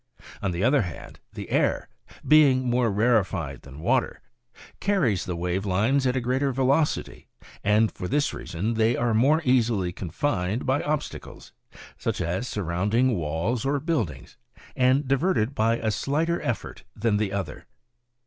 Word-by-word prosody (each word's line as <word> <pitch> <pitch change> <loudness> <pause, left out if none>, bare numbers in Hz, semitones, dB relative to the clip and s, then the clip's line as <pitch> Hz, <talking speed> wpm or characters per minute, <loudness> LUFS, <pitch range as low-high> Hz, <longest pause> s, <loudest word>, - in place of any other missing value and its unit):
On 100 - -1
the 90 +2 -2
other 130 +3 +4
hand, 85 -5 -8
the - - -8
air, - - +1 0.4
being 140 -4 +5
more 120 -1 +2
rarefied 95 - 0
than 70 +2 -12
water, - - 0 0.6
carries 145 - +1
the 90 - -3
wave 90 +3 -2
lines 110 +8 +1
at 125 - 0
a - - +2
greater 130 +3 0
velocity, 135 +4 0 0.4
and 105 +1 +3
for 90 - -6
this 145 +5 0
reason 100 +8 -3
they 115 +1 +2
are 120 -1 +1
more 145 +9 +3
easily 115 -8 +2
confined 95 - -2
by 130 +2 +1
ob 150 -1 0
stacles, - - -11 0.5
such - - -2
as 90 +9 -2
surrounding 105 +7 0
walls 85 +9 -2
or 140 +1 0
buildings, 115 - -3 0.4
and 130 +2 +2
diverted 135 - +1
by 115 -1 +1
a 110 -2 -1
slighter 155 +9 -1
effort 120 - -4
than 105 -1 +1
the 105 -2 -1
other. 95 -7 -5
115 Hz, 150 wpm, -25 LUFS, 95-135 Hz, 0.6 s, being